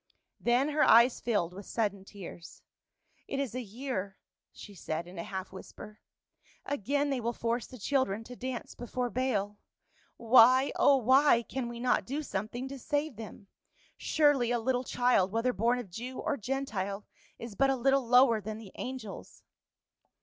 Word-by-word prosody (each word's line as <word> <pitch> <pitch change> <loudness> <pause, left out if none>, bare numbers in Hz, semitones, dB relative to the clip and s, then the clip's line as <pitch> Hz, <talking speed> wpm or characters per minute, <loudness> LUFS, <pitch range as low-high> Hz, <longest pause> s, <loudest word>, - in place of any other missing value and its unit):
Then 245 +4 +2
her 300 0 0
eyes 235 +2 +6
filled 190 -7 0
with 200 +1 -10
sudden 200 -4 -2
tears, 180 -4 -11 0.3
" - - -57 0.3
It 275 - -3
is 275 -6 -2
a 255 - -3
year," 220 -4 -5 0.3
she 205 - -12
said 165 -2 -4
in 175 0 -10
a - - -3
half 190 -1 -6
whisper. 210 +2 -11 0.7
"Again 285 +2 -1
they 260 -2 -1
will 235 +1 -1
force 235 +1 -2
the 255 - -11
children 225 -3 0
to 250 +2 -10
dance 255 -1 -5
before 245 0 -4
Baal. 210 -5 -1 0.6
Why, 255 +3 +6
oh 280 - +5
why, 260 0 +4
can 245 +1 -4
we 235 0 -7
not 250 +1 +1
do 285 +4 -3
something 225 +3 -4
to 275 0 -7
save 290 +1 -2
them? 215 -2 -10 0.5
Surely 290 -6 +2
a 245 - +1
little 250 +2 0
child, 245 -7 +2
whether 230 +3 0
born 235 +5 +1
of 230 -7 -7
Jew 245 +7 -6
or 300 - -1
Gentile, 210 -6 -3 0.3
is 230 -2 -8
but 270 +6 +2
a 270 - +2
little 270 0 +2
lower 245 -2 +5
than 215 +2 -6
the 215 -4 -11
angels." 250 -6 -7
240 Hz, 170 wpm, -30 LUFS, 210-260 Hz, 0.7 s, eyes